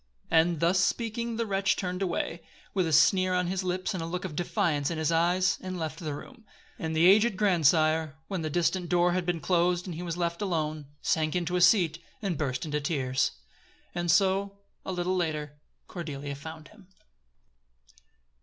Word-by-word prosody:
And, 165 0 +3
thus 175 +3 +3
speaking 230 +3 -1
the 230 - 0
wretch 195 -1 +1
turned 180 0 -3
away, 170 -2 -2 0.3
with 185 -3 +1
a - - -2
sneer 185 +4 +4
on 180 0 +1
his 185 +2 -2
lips 185 +2 -2
and 185 - -3
a 165 - -4
look 180 +2 -4
of 165 -5 -6
defiance 150 -3 0
in 165 - -3
his 160 0 0
eyes, 175 +3 +2
and 185 -1 -5
left 160 -1 -4
the 155 -4 -4
room. 240 - -12 0.4
And 160 0 -3
the 160 +2 +4
aged 205 +2 +5
grandsire, 160 -5 +3
when 190 -4 -3
the 155 - -2
distant 175 +2 0
door 175 +1 +3
had 180 0 -1
been 175 -2 0
closed 175 +1 +1
and 180 - -5
he 165 - -6
was 175 -1 -4
left 170 0 -2
alone, 155 -6 -2 0.2
sank 155 0 +1
into 175 0 -1
a 180 - +1
seat, 175 -3 +4 0.2
and 195 -5 -2
burst 135 -3 -2
into 150 -1 -2
tears. 130 -4 0 0.6
And 175 0 -2
so, 195 +3 +2 0.3
a - - -4
little 180 0 -1
later, 150 -4 -2 0.3
Cordelia 145 -5 -5
found 155 +2 -9
him. 205 -4 -19
175 Hz, 185 wpm, -28 LUFS, 160-185 Hz, 0.6 s, aged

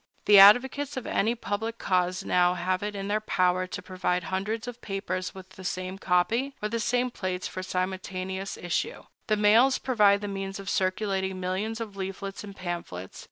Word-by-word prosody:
The 205 -1 +8
advocates 260 +7 +6
of 260 - -4
any 225 +4 +1
public 225 0 -3
cause 180 -2 0
now 180 0 +3
have 185 +1 -1
it 205 0 -3
in 195 0 -4
their 210 +1 0
power 185 -2 +1
to - - -6
provide 180 -1 -1
hundreds 215 +5 -2
of 245 -1 -6
newspapers 195 -4 -4
with 190 -1 -11
the 190 - -12
same 185 +1 -4
copy, 225 +11 +1
or 210 - -2
the 230 +1 -2
same 245 +3 +1
plates, 185 -4 -3
for 185 - -6
simultaneous 185 +1 -3
issue. 175 -1 -2 0.2
The 215 -2 +2
mails 225 +6 +5
provide 210 -5 +3
the 205 - -3
means 195 0 -4
of 195 0 -4
circulating 190 0 0
millions 195 +5 -2
of 215 -3 -6
leaflets 195 +1 -5
and 200 -1 -9
pamphlets. 170 - -6
195 Hz, 180 wpm, -27 LUFS, 185-215 Hz, 0.2 s, The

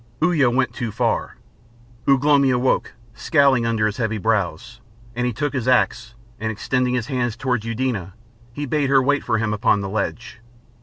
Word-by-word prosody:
Uya 160 -6 +3
went 125 +2 0
too 120 -3 -4
far. 115 +2 -1 0.7
Ugh 135 -1 +4
lomi 140 -2 +4
awoke, 125 0 +1 0.2
scowling 135 -2 +2
under 110 -2 +1
his 105 0 -2
heavy 110 -3 -1
brows, 110 +2 -2 0.3
and 125 0 0
he - - 0
took 145 +6 -3
his 130 -3 -2
axe, 120 -2 +1 0.2
and 110 0 -2
extending 125 +3 -1
his 120 -3 -1
hand 120 -3 -2
towards 125 -4 -2
Eudena 115 -6 -3 0.4
he 145 +5 -5
bade 145 0 0
her 135 -1 +5
wait 145 +2 +1
for 115 - 0
him 110 -1 -1
upon 105 -1 +2
the 100 - -4
ledge. 110 +2 -4
120 Hz, 175 wpm, -21 LUFS, 110-130 Hz, 0.7 s, her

